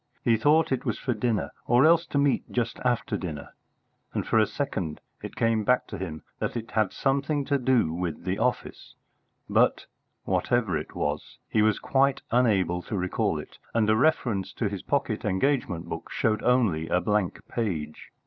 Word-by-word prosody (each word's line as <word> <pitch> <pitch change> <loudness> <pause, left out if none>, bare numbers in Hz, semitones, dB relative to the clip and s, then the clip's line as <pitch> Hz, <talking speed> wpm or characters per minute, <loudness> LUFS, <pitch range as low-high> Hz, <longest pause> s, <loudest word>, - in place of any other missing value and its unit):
He 115 - +4
thought 150 +8 +3
it 130 - 0
was - - -1
for 130 - -1
dinner, 115 0 -1 0.2
or 120 +3 +5
else 165 +1 +5
to - - -2
meet 140 -1 +1
just 120 -2 -1
after 120 -4 0
dinner, 80 -7 -6 0.6
and - - -1
for 110 - +3
a 110 - +4
second 95 - -3 0.2
it - - -7
came 115 -1 +1
back 125 +3 +2
to - - -6
him 80 -5 -6 0.2
that - - -2
it 115 +1 -6
had 110 -4 +1
something 140 +1 0
to 140 -1 +1
do 125 -10 +2
with 85 -2 -3
the 95 +2 -2
office, 125 +2 -2 0.5
but, - - +2 0.4
whatever 115 -8 +1
it 75 - -5
was, 75 0 -3
he 110 - +2
was 110 -1 +3
quite 135 0 +1
unable 100 -8 +2
to 100 - -4
recall 90 0 0
it, - - -9 0.2
and 110 -2 +3
a - - +4
reference 110 - +1
to 115 - -1
his 100 -2 -5
pocket 130 -6 -1
engagement 100 - 0
book - - -6
showed 110 -1 0
only 110 -11 +2
a 90 - +2
blank 105 -2 0
page. 85 -10 -3
110 Hz, 180 wpm, -27 LUFS, 95-125 Hz, 0.6 s, or